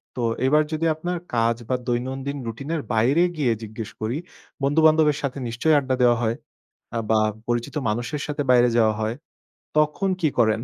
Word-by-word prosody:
তো - - -6 0.3
এবার 150 +3 +4
যদি 160 +1 -1
আপনার 175 +3 -3 0.2
কাজ 115 0 +2
বা 130 - +2
দৈনন্দিন 130 +3 -2
রুটিন 125 +6 -6
এর 160 - -2
বাইরে 125 +9 +3 0.2
গিয়ে 130 -5 +2
জিজ্ঞেস 110 0 -6
করি 110 +3 -1 0.5
বন্ধু-বান্ধবের 155 +1 +4
সাথে 140 -1 -3
নিশ্চয়ই 125 +7 +2
আড্ডা 130 -2 -1
দেওয়া 120 -1 +5
হয় 115 0 +1 0.6
আ - - 0
বা 110 -1 +4 0.3
পরিচিত 120 +3 -2
মানুষের 120 +7 -2
সাথে 150 0 -2
বাইরে 125 -1 +5
যাওয়া 110 -2 +4
হয়। 110 +2 -1 0.6
তখন 155 +6 +2
কি 160 - +3
করেন? 110 -2 +3
130 Hz, 170 wpm, -23 LUFS, 115-150 Hz, 0.6 s, দেওয়া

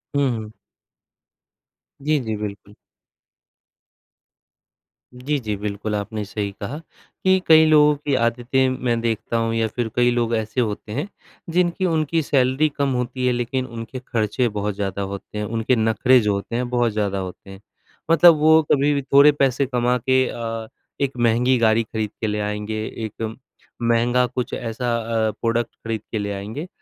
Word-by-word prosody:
हुँ, 140 -1 +2
हुँ। 110 -1 -8 1.5
जी, 150 +1 +1
जी। 110 -1 -2
बिल्कुल। 105 -1 -7 2.4
जी, 140 +4 -2
जी, 105 -3 -3
बिल्कुल 105 +1 -3
आपने 105 +1 -3
सही 100 0 -4
कहा 120 +9 -4 0.5
कि 190 0 +4
कई 160 0 +7
लोगों 150 -1 +5
की 145 -1 -2
आदतें 120 +2 +1 0.2
मैं 120 -2 +1
देखता 115 0 -1
हूँ 115 0 0
या 115 -1 +1
फ़िर 115 +1 -3
कई 120 0 +4
लोग 120 -1 0
ऐसे 110 +3 -1
होते 105 -2 -3
हैं 145 - -3 0.5
जिनकी 180 +1 +1
उनकी 160 -1 +1
सैलरी 135 +1 +2
कम 140 -1 +1
होती 125 +1 -2
है 125 - +2
लेकिन 125 +2 -2
उनके 115 +1 -7
ख़र्चे 115 +1 0
बहुत 105 0 -2
ज़्यादा 100 -1 -3
होते 100 +1 -6
हैं 105 - -2
उनके 115 +3 0
नख़रे 115 +3 +4
जो 105 -1 +1
होते 100 +4 -4
हैं 125 0 -1
बहुत 120 -2 +1
ज़्यादा 100 -2 -1
होते 95 +1 -8
हैं। 95 0 -11 0.5
मतलब 165 0 +7
वो 160 +1 +6
कभी-भी 145 0 +3
थोड़े 140 +2 +6
पैसे 135 -1 +1
कमा 125 -1 +1
के 130 0 +4
अ, 115 -1 -5 0.3
1 135 -2 -1
महँगी 120 +2 +3
गाड़ी 115 0 +3
ख़रीद 110 -1 -4
के 110 - 0
ले 105 0 -1
आएँगे। 105 +1 -3 0.2
एक 110 +1 -5 0.5
महँगा 120 +2 +2
कुछ 125 0 -4
ऐसा 120 +1 -2 0.3
अ, - - 0
प्रोडक्ट 115 0 -1
ख़रीद 115 -2 -2
के 110 - -1
ले 100 0 -3
आएँगे 110 - -6
120 Hz, 165 wpm, -22 LUFS, 110-130 Hz, 2.4 s, कई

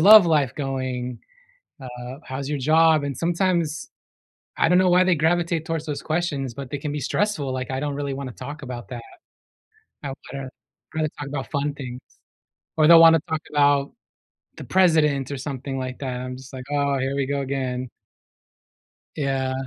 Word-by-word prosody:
love 210 +2 +10
life 145 -7 +2
going?" 130 -3 -3 0.6
uh, 125 0 -8
"How's 135 +1 -5
your 150 -1 -1
job?" 155 +2 +4
and 140 -2 -3
sometimes, 170 -2 0 0.7
I - - +4
don't 180 - +4
know 185 -1 +4
why 180 +1 +6
they 185 -1 +4
gravitate 165 +1 +1
towards 165 -1 -3
those 150 -2 -4
questions, 155 -6 -1
but 135 +2 -7
they - - -2
can 145 0 -4
be 150 - -3
stressful, 185 - -1
like 130 0 -4
I 130 - -2
don't 145 0 -2
really 140 -1 -3
wanna 135 -2 -5
talk 145 +5 -8
about 125 -3 -7
that. 120 -2 -6 1.0
I 140 - -3 0.2
wanna 135 -1 -5 0.5
rather 155 -1 0
talk 145 - -4
about 140 -1 -5
fun 145 0 -1
things, 125 -3 -7 0.8
or 155 -1 +5
they'll 165 0 +9
wanna 165 -1 +8
talk 160 -1 -2
about 145 -1 +3 0.7
the - - -7
president 155 -7 +3
or 140 - -3
something 135 0 -5
like 130 -1 -4
that, 130 -3 -3
I'm 125 0 -5
just 130 +2 -13
like, 130 -1 -7
"Oh, 140 -1 +1
here 135 +1 -1
we 140 -1 0
go 140 0 -1
again." 130 -2 -3 1.3
Yeah. 135 -2 -1
140 Hz, 175 wpm, -24 LUFS, 130-160 Hz, 1.3 s, love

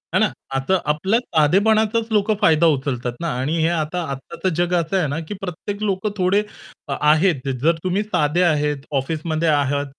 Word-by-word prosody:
है - - +4
ना, - - +4 0.3
आता 135 +8 +1
आपल्याला 190 +10 +1 0.2
साधेपणाचाच 220 +8 +3
लोकं 210 0 +2
फायदा 160 +1 +4
उचलतात 125 -3 -3
ना, 170 - -2
आणि 150 +6 -1
हे 160 - +3
आता 170 +1 -1
आत्ताचं 135 +7 -4
जग 175 +1 0
असं 170 +4 -1
आहे 175 - +1
ना, 145 +3 -3
की - - -5
प्रत्येक 195 +3 -5
लोकं 200 +1 -1
थोडे 185 +3 +2 0.5
अ, 140 - -2
आहेत. 150 -2 +3
जर 165 +3 +4
तुम्ही 185 +3 0
साधे 165 -4 0
आहेत, 150 -4 0
ऑफिसमध्ये 160 +3 -2
आहात, 145 -1 +1
165 Hz, 175 wpm, -21 LUFS, 150-195 Hz, 0.5 s, है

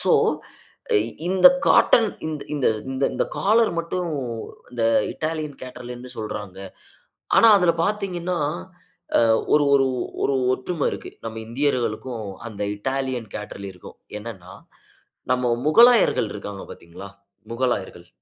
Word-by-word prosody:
So, - - +3 1.2
இந்த 190 +7 +6 0.2
cotton 225 -3 +5 0.2
இந்த 150 -2 -1 0.2
இந்தந்த 135 +1 0
காலர் 220 +1 +3
மட்டும் 170 +1 -2 0.6
இந்த 120 -2 -1 0.3
இட்டாலியன் 155 -2 -3
கேட்டர்லியர்னு 125 0 -8
சொல்றாங்க. 105 -3 -6 0.8
ஆனா, 230 - +7
அதுல 180 -3 +4
பார்த்தீங்கன்னா, 185 -4 -2 0.7
அ - - +4 0.3
ஒரு 145 -1 +5
ஒரு 135 -1 +5 0.4
ஒரு 140 - +2 0.2
ஒற்றும 145 +4 -2
இருக்கு. - - -7
நம்ம 115 0 -5
இந்தியர்களுக்கும், 120 -3 -1 0.2
அந்த 105 -1 -8 0.2
இட்டாலியன் 130 -2 -3
கேட்டர்லியருக்கும். 100 -3 -8 0.2
என்னனா, 95 -5 -9 0.8
நம்ம 125 -1 +1
முகலாயர்கள் 235 - +5
இருக்காங்க 100 -1 -7
பார்த்தீங்களா? 90 +4 -11 0.4
முகலாயர்கள். 110 -8 -2
130 Hz, 100 wpm, -23 LUFS, 110-165 Hz, 1.2 s, ஆனா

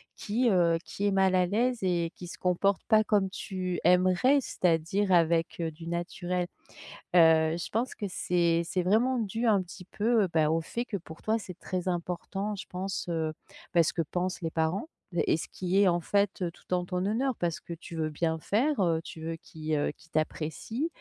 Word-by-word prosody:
qui, 235 +4 +1
heu, 170 -3 +3
qui 200 - -4
est 200 - +3
mal 190 -1 +3
à 180 - +4
l'aise 235 +6 +1
et 175 -2 +1
qui 180 - -9
se - - -9
comporte 185 +2 +1
pas 220 -1 +5
comme 205 -3 +2
tu 185 -2 -4
aimerais. 185 - +4
C'est-à-dire 180 +1 +1
avec, 165 -1 +3
heu, 165 -1 -1
du 165 +2 -11
naturel. 175 +1 -2 0.7
Heu, 160 -1 +6
je 175 - -5
pense 235 +4 -1
que 205 - -4
c'est 170 -2 +1
c'est 180 +2 -1
vraiment 235 +7 +3
dû 225 +2 -2
un 210 -4 +4
petit 180 +1 -10
peu, 220 +2 +2
heu, - - +1
bah, 155 -2 +3
au 165 +1 +1
fait 240 +9 -4
que 215 - -5
pour 160 -2 -12
toi 220 +1 +1
c'est 180 -4 -9
très 185 -1 -3
important 180 +4 -3
je - - -7
pense, 190 +1 -4
heu, 160 -2 -1 0.4
bah, 170 - +6
ce - - 0
que 170 - 0
pensent 180 +4 -3
les 165 - -2
parents 165 - 0 0.4
et - - +4
ce - - -5
qui 185 +2 +1
est 195 - +5
en 175 0 +2
fait, 200 +2 +1
heu, 175 - 0
tout 180 - -8
en 180 0 +1
ton 180 0 -2
honneur 245 +4 0
parce 170 -2 -1
que 170 - -8
tu 170 0 -9
veux 155 -1 0
bien 160 +1 -1
faire, 250 - +1
heu, 165 -3 +2
tu 165 - -9
veux 165 +1 -3
qu'ils, 155 -1 -4
heu, 145 - 0
qu'ils 165 +2 -22
t'apprécient. 160 - -2
180 Hz, 210 wpm, -29 LUFS, 165-205 Hz, 0.7 s, Heu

